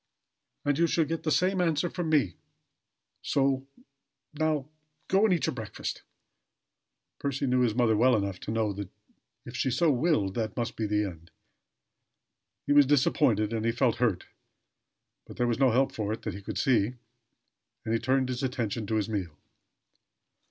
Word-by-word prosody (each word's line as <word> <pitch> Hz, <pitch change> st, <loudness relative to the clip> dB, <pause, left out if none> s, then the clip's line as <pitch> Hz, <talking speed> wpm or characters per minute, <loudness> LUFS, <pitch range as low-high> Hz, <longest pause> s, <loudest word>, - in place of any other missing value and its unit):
"And 145 Hz, +1 st, +1 dB
you'll 170 Hz, -1 st, +3 dB
get 165 Hz, +1 st, -3 dB
the 155 Hz, -, -2 dB
same 185 Hz, +3 st, +2 dB
answer 165 Hz, -1 st, +1 dB
from 175 Hz, -2 st, -3 dB
me! 135 Hz, -, +2 dB, 0.9 s
So, 135 Hz, -1 st, 0 dB, 0.7 s
now, 155 Hz, -2 st, 0 dB, 0.4 s
go 195 Hz, +3 st, +4 dB
and 205 Hz, -, +4 dB
eat 170 Hz, -, -1 dB
your 160 Hz, -, -1 dB
breakfast." 110 Hz, -6 st, -5 dB, 1.2 s
Percy 140 Hz, 0 st, -2 dB
knew 125 Hz, -1 st, +2 dB
his 120 Hz, -4 st, +2 dB
mother 120 Hz, -3 st, +3 dB
well 125 Hz, +3 st, +4 dB
enough 100 Hz, -3 st, -2 dB
to -, -, -5 dB
know 110 Hz, -2 st, 0 dB
that 100 Hz, -1 st, -6 dB, 0.6 s
if 120 Hz, -, -9 dB
she 130 Hz, -, 0 dB
had 125 Hz, -, -1 dB
so 170 Hz, 0 st, +3 dB
willed, 125 Hz, -, +1 dB
that 110 Hz, +1 st, -3 dB
must 120 Hz, -1 st, -2 dB
be 110 Hz, -, -2 dB
the 105 Hz, 0 st, +1 dB
end. 85 Hz, -3 st, -9 dB, 1.4 s
He 145 Hz, -, +2 dB
was 145 Hz, -2 st, +6 dB
disappointed, 115 Hz, -6 st, +2 dB
and 110 Hz, -1 st, -1 dB
he 115 Hz, -, +2 dB
felt 120 Hz, 0 st, +1 dB
hurt; 110 Hz, -7 st, 0 dB, 1.0 s
but -, -, -11 dB
there 125 Hz, -, +1 dB
was 120 Hz, +1 st, 0 dB
no 135 Hz, -2 st, +5 dB
help 130 Hz, +3 st, +2 dB
for 105 Hz, -1 st, -3 dB
it 110 Hz, -, -5 dB
that 110 Hz, -, -3 dB
he 100 Hz, -, -8 dB
could 100 Hz, -1 st, -6 dB
see 120 Hz, 0 st, +2 dB, 0.9 s
and 110 Hz, -, -1 dB
he 115 Hz, -, +2 dB
turned 130 Hz, +2 st, +1 dB
his 125 Hz, -1 st, -3 dB
attention 120 Hz, -5 st, -2 dB
to 110 Hz, -, -1 dB
his 110 Hz, -1 st, 0 dB
meal. 95 Hz, -8 st, -4 dB
125 Hz, 175 wpm, -28 LUFS, 110-145 Hz, 1.4 s, was